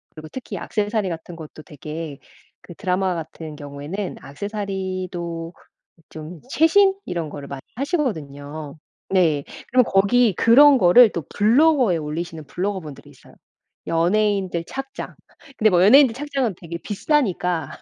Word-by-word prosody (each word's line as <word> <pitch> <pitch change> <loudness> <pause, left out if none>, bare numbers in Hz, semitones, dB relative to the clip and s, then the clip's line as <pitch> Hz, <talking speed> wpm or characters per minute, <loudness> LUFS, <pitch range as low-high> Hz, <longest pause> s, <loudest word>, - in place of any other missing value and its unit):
그리고 155 -1 -9
특히 260 - -7
액세서리 210 -2 -1
같은 165 0 -7
것도 155 -1 -11
되게 150 0 -7 0.4
그 175 - -12
드라마 185 0 -1
같은 160 -1 -7
경우에는 145 +7 -6
액세서리도 185 -2 -5 0.6
좀 160 +2 -9
최신 325 +9 +4
이런 170 -3 -3
거를 145 -1 -8
많이 140 -1 -7
하시거든요. 155 - -4 0.3
네. 165 -7 +2 0.3
그럼 255 +1 +5
거기 205 +3 +3
그런 275 - +7
거를 220 +4 +7
또 170 - -4
블로그에 245 - +4
올리시는 160 +1 -5
블로거 190 +5 -2
분들이 150 -5 -11
있어요. - - -19 0.5
연예인들 185 0 +1
착장. 270 +5 -7 0.4
근데 215 - +4
뭐 180 -2 +4
연예인들 250 +3 +6
착장은 270 -6 -2
되게 170 -1 -7
비싸니까 190 - 0
185 Hz, 315 characters per minute, -22 LUFS, 160-225 Hz, 0.6 s, 그런